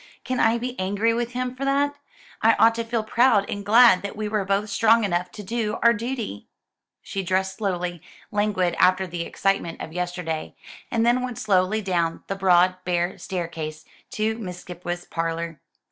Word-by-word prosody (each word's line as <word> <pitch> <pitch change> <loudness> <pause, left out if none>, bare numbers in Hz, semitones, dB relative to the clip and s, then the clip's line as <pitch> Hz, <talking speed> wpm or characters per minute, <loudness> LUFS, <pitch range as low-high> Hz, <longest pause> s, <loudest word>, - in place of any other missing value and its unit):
"Can 255 0 -2
I 225 +1 +4
be 245 +1 -4
angry 205 +4 +1
with 240 +1 -2
him 250 0 -2
for 265 - -5
that? 280 +1 +2 0.5
I 225 0 +5
ought 225 0 +5
to 230 0 -3
feel 230 -1 -2
proud 225 -2 +3
and 205 - -4
glad 225 -2 +6
that 200 - -6
we 215 0 -3
were 210 -1 0
both 200 +2 -1
strong 225 +2 +4
enough 180 -2 0
to 210 - -8
do 220 +1 -2
our 235 0 +7
duty." 230 - -4 0.6
She 195 - -4
dressed 190 +1 -1
slowly, 180 -5 -2 0.3
languid 200 -4 +1
after 185 +1 +4
the 175 -1 -5
excitement 195 -1 -1
of 160 - -7
yesterday, 175 -2 -3 0.3
and 230 -1 +1
then 240 +1 +3
went 250 -2 -4
slowly 205 +1 +1
down 170 -3 -1
the 195 - -3
broad 185 -1 +4
bare 175 0 -1
staircase 160 -4 -5 0.3
to 220 +1 -1
Miss 180 -4 -6
Skipwith's 175 0 -6
parlour. 165 -1 -3
195 Hz, 175 wpm, -24 LUFS, 180-230 Hz, 0.6 s, our